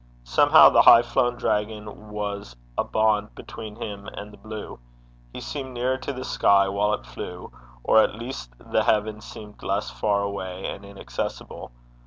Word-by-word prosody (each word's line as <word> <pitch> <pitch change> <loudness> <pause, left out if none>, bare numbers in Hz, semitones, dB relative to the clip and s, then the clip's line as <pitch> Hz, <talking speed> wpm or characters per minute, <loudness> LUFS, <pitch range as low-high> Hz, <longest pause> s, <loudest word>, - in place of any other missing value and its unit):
Somehow - - +7
the - - +5
high 115 - +8
flown 120 0 +1
dragon 105 -1 -3
was 100 -11 -5 0.2
a - - +1
bond 110 -1 +1
between 110 -2 -9
him 105 -3 -7
and 105 -1 -8
the - - -13
blue; 110 -1 -8 0.5
he - - -8
seemed 130 -3 -6
nearer 130 +2 0
to 130 - -4
the 130 -1 -6
sky 100 -4 +3
while 105 +2 +1
it - - -13
flew, - - -8 0.3
or 110 - +5
at 110 - +3
least 115 - -7
the - - -1
heaven 110 0 +1
seemed 105 -1 -11
less 100 +2 -2
far 100 -1 0
away 95 -2 -5
and 100 - -5
inaccessible. 100 -16 -6
105 Hz, 165 wpm, -24 LUFS, 100-110 Hz, 0.5 s, high